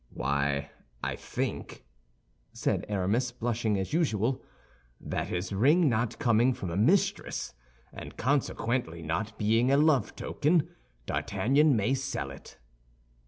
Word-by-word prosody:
"Why, 70 +1 -1 0.3
I - - -1
think," - - -5 0.7
said - - -1
Aramis, 105 +6 0
blushing 115 -3 -1
as 95 +8 -3
usual, 130 - +1 0.6
"that - - -3
his 90 +3 -3
ring 145 - +4
not 115 0 0
coming 120 -1 +3
from 90 - -5
a - - -3
mistress, 145 - +1 0.4
and - - -9
consequently 120 - -1
not 105 +8 -3
being 115 +4 +2
a 140 - +5
love 145 -6 +3
token, 160 +2 +1 0.4
D'Artagnan 140 +3 +2
may 110 +4 +1
sell 130 - -3
it." 70 - -13
115 Hz, 120 wpm, -29 LUFS, 95-135 Hz, 0.7 s, a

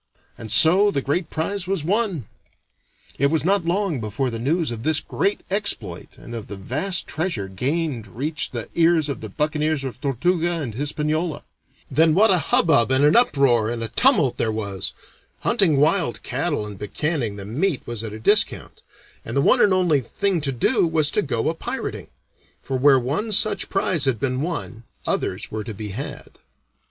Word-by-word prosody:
And 110 -2 -6
so 175 - +7
the 140 -9 -2
great 155 +4 -1
prize 180 +3 -3
was 190 -5 -1
won. 190 - 0 0.9
It 140 - +4
was 155 +1 0
not 195 -1 +2
long 180 -5 0
before 115 +5 -2
the 115 - -4
news 155 +4 0
of 115 -1 -5
this 155 +4 +2
great 200 - -1
exploit 200 +1 -3
and 120 - -11
of 115 -3 -6
the 100 - -7
vast 150 - 0
treasure 160 - -2
gained 130 - -2
reached 140 - -3
the 120 -4 -5
ears 165 -2 +3
of 140 - -4
the 110 - -7
buccaneers 150 +4 -1
of 125 -2 -6
Tortuga 170 +5 0
and 130 -8 -4
Hispaniola. 150 +5 -2 0.5
Then 155 +3 +4
what 215 +2 +5
a 185 - +3
hubbub 140 -5 +3
and 130 +2 +3
an 150 - +4
uproar 135 - +3
and 115 -1 -3
a 115 - -4
tumult 165 - +3
there 110 - 0
was! 100 -4 -4 0.5
Hunting 165 -7 +2
wild 155 -2 +1
cattle 145 -2 -2
and 105 -2 -9
buccanning 120 0 -2
the 100 -1 -8
meat 145 - -1
was 120 -2 -5
at 110 - -5
a 105 - -7
discount, 205 - +1 0.4
and - - -4
the - - +4
one - - +4
and 205 - +5
only 175 -6 +2
thing 185 - -1
to 140 -2 -1
do 170 - +2
was 160 -2 +2
to 210 - +1
go 125 - -2
a 160 - +1
pirating; 165 - -5 0.6
for 135 - -3
where 135 +1 +5
one 150 - -2
such 210 +1 +2
prize 185 -6 0
had 130 -5 0
been 130 +1 -1
won, 155 -8 -4 0.2
others - - -2
were 110 0 -4
to 110 -2 -7
be 105 0 -6
had. 125 +9 -7
150 Hz, 185 wpm, -22 LUFS, 120-175 Hz, 0.9 s, so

